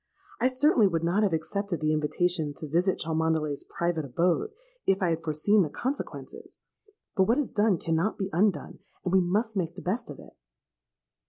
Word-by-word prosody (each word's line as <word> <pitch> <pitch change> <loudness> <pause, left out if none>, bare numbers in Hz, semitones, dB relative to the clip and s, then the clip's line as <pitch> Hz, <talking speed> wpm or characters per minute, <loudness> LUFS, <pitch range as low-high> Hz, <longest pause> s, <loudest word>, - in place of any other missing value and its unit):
I 245 - +3
certainly 255 -4 +4
would 165 -3 -1
not 175 +5 +2
have 205 -3 +2
accepted 180 +3 -2
the 155 0 +1
invitation 155 0 0
to 155 - -7
visit 175 +5 +1
Cholmondeley's 160 -2 -1
private 170 -2 -2
abode, 170 - 0 0.4
if 195 0 +3
I 185 - +1
had 165 0 -1
foreseen 165 +7 +3
the 160 - 0
consequences. 265 - -6 0.6
But 190 -3 +4
what 235 - +3
is 295 -4 -1
done 210 -3 +2
cannot 165 +5 -1
be 195 -1 -3
undone; 185 -2 0 0.3
and 180 - -1
we 190 - +6
must 210 +5 0
make 175 -3 -2
the 185 - -8
best 225 +7 -2
of - - -8
it.' - - -14
180 Hz, 180 wpm, -27 LUFS, 160-205 Hz, 0.6 s, we